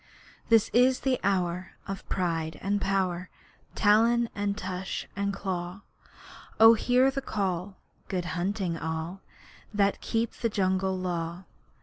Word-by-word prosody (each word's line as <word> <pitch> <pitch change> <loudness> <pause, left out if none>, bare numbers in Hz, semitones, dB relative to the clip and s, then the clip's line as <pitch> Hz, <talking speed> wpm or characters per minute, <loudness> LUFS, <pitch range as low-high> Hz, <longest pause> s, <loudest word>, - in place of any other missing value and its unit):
This 225 -2 +4
is 250 +2 +4
the 265 -2 +1
hour 185 -2 0
of 195 -1 -6
pride 165 -3 -1
and 200 +1 0
power, 185 -2 0 0.5
Talon 230 +3 +4
and 205 0 -2
tush 185 0 -4
and 200 0 -1
claw. 185 -1 -4 0.8
Oh 225 +1 +10
hear 250 +4 +3
the 275 0 -3
call! 190 -5 -2 0.3
Good 180 -3 -2
hunting 185 -1 -1
all 160 +3 -4 0.5
That 200 -1 +1
keep 230 0 -1
the 230 - -1
Jungle 190 -2 0
Law! 175 -1 -3
195 Hz, 125 wpm, -28 LUFS, 180-210 Hz, 0.8 s, Oh